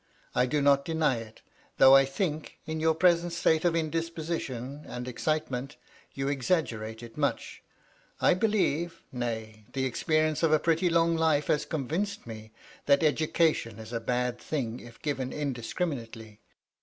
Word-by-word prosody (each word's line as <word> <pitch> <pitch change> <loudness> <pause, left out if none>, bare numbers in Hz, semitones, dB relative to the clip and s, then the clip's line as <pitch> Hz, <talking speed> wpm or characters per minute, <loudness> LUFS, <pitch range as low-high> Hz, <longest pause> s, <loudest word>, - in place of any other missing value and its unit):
I 125 +1 +2
do 145 +2 0
not 140 -1 +5
deny 155 -5 +1
it, 110 -1 -10 0.4
though 135 0 +8
I 135 0 +7
think, 155 +2 -3
in 160 0 -3
your 160 0 +2
present 170 0 +3
state 160 -1 +2
of 175 -2 +2
indisposition 160 -4 -3
and 125 0 -6
excitement, 135 0 -2 0.4
you 135 0 -2
exaggerate 120 -6 -1
it 115 +2 -11
much. 145 -1 -2 0.6
I - - +5
believe 175 -5 0
— - - -32
^nay, 110 -3 -5
the 130 -1 0
experience 155 +4 +1
of 165 -2 +3
a - - +7
pretty 165 +3 +2
long 165 0 +3
life 160 -3 +2
has 150 0 +2
convinced 165 +8 -3
me 110 -1 -9 0.2
— - - -23
that 140 +2 +5
education 155 -6 +1
is 110 +1 -9
a 115 - -1
bad 125 +1 -1
thing, 125 -6 -3
if 120 -1 -13
given 135 -4 -2
indiscriminately. 120 - -4
145 Hz, 155 wpm, -28 LUFS, 125-160 Hz, 0.6 s, though